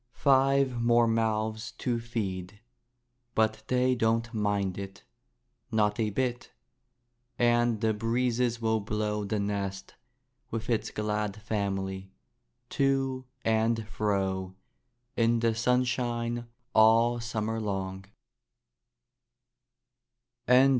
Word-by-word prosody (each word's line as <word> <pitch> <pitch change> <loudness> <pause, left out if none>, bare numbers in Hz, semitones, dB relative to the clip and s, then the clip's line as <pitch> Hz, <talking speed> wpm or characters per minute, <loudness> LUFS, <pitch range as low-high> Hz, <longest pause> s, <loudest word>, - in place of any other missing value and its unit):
Five 135 -2 +3
more 120 0 +4
mouths 110 0 -1
to 120 -2 -2
feed! 100 -4 -4 0.8
but 110 0 +2
they 125 0 +2
don't 115 -1 0
mind 100 -3 0
it, 95 0 -8 0.7
not 105 0 +1
a 110 -1 +1
bit. 125 +3 -2 0.9
And 120 -2 +2
the 110 -1 +2
breezes 120 +2 0
will 110 -1 +1
blow 105 0 -2
the 105 +1 -1
nest, 100 -1 -3 0.6
with 115 +1 -3
its 115 - 0
glad 105 -1 -2
family, 95 -2 -3 0.6
to 135 -1 +1 0.2
and 110 0 +1
fro 95 -3 -1 0.6
in 115 0 +3
the 115 0 +2
sunshine 120 0 0 0.3
all 115 +2 +5
summer 115 -1 -2
long. 95 -2 -3
110 Hz, 95 wpm, -29 LUFS, 105-120 Hz, 0.9 s, all